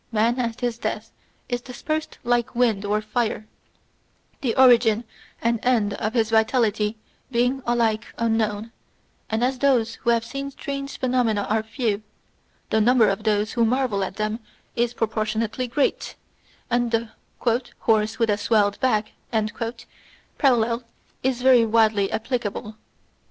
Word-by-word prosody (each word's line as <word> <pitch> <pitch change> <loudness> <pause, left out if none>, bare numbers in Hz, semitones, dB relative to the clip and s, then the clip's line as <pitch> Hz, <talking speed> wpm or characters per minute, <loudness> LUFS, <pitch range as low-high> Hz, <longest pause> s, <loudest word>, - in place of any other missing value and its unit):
mari 230 +3 +2
at 235 -1 -2
his 240 -1 -1
death 215 +1 -4 0.4
is 245 -1 -2
dispersed 310 +5 -4
like 240 0 0
wind 230 -5 +2
or 210 +1 0
fire, 215 0 -2 1.0
the 245 -5 0
origin 235 -4 +5 0.4
and 235 0 +2
end 225 -5 +2
of 215 +3 -3
his 225 -2 +1
vitality 220 -1 +2 0.3
being 250 +2 +1
alike 230 -2 +1
unknown; 225 -1 0 0.6
and 220 +2 0
as 255 +1 0
those 245 -5 +2
who 235 - 0
have 230 -1 +2
seen 275 +3 -5
strange 275 0 -6
phenomena 245 -5 +1
are 220 0 +2
few, 220 -1 -2 0.7
the 220 - +3
number 235 -1 +5
of 195 +2 -2
those 210 0 +1
who 235 - +1
marvel 235 -4 +1
at 190 - -4
them 215 +1 -2 0.4
is 240 0 0
proportionately 220 +2 -1
great, 275 +4 -1 0.6
and 240 0 +2
the 230 0 -1 0.2
' 245 +1 -2
horse 215 -1 +2
with 230 -3 +2
a 205 - 0
swelled 205 -1 +2
back 215 -5 +1 0.8
' - - -29
parallel 240 -4 +2 0.4
is 255 -1 -1
very 255 -3 +6
widely 220 -3 +3
applicable. 220 -3 -3
230 Hz, 140 wpm, -23 LUFS, 215-245 Hz, 1.0 s, very